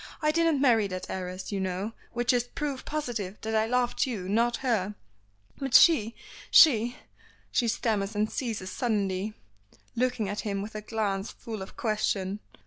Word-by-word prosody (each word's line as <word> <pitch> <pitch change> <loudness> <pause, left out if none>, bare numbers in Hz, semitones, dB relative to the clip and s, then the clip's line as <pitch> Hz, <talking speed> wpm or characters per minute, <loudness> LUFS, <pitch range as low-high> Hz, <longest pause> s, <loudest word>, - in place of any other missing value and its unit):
"I 305 -1 +2
didn't 330 -2 +2
marry 230 -6 +4
that 185 -1 -6
heiress, 185 +1 -5
you 200 - -1
know, 190 +3 -2 0.2
which 240 +2 +1
is 245 -1 +1
proof 275 +1 -4
positive 235 -10 -3
that 220 0 -3
I 220 0 +2
loved 250 +2 +1
you, 205 -8 -4
not 230 +4 +2
her." 210 -4 0 0.6
"But 270 -2 -1
she 250 -6 +6 0.3
she 240 -6 +6 0.3
" - - -30
she 240 - +2
stammers 215 -3 0
and 210 +1 +2
ceases 220 -8 -3
suddenly, 205 -3 -1 0.6
looking 245 -3 0
at 205 +2 -3
him 200 -2 -2
with 215 - -8
a 215 - -5
glance 205 -2 -2
full 220 -3 -7
of 190 - -9
question. 210 -3 -1
220 Hz, 165 wpm, -28 LUFS, 200-245 Hz, 0.6 s, she